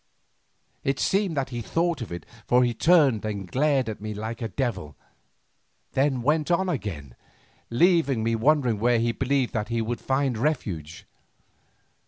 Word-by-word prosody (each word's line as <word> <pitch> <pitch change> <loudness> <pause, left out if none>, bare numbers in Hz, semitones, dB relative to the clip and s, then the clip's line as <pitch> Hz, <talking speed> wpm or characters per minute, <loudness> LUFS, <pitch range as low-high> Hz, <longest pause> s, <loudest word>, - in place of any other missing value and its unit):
It 135 0 0
seemed 195 -5 +1
that 135 -1 -1
he 120 -1 -4
thought 165 +4 -1
of 115 - -6
it, 85 -2 -6 0.2
for 125 +1 +4
he 120 -1 +1
turned 140 - +4
and 105 -3 -3
glared 135 +3 +1
at 110 -2 -5
me 105 0 -5
like 110 +3 -5
a 115 - -1
devil, 100 - -3 0.9
then 135 -2 +1
went 150 +3 +1
on 180 +2 +2
again, 85 - -4 0.5
leaving 140 -3 +3
me 115 +1 +1
wondering 125 -2 +2
where 120 +2 +3
he 115 +1 +1
believed 130 +1 0
that 110 -1 -2
he 115 0 -1
would 115 +1 -3
find 135 -3 0
refuge. 90 - -3
120 Hz, 160 wpm, -25 LUFS, 110-145 Hz, 0.9 s, for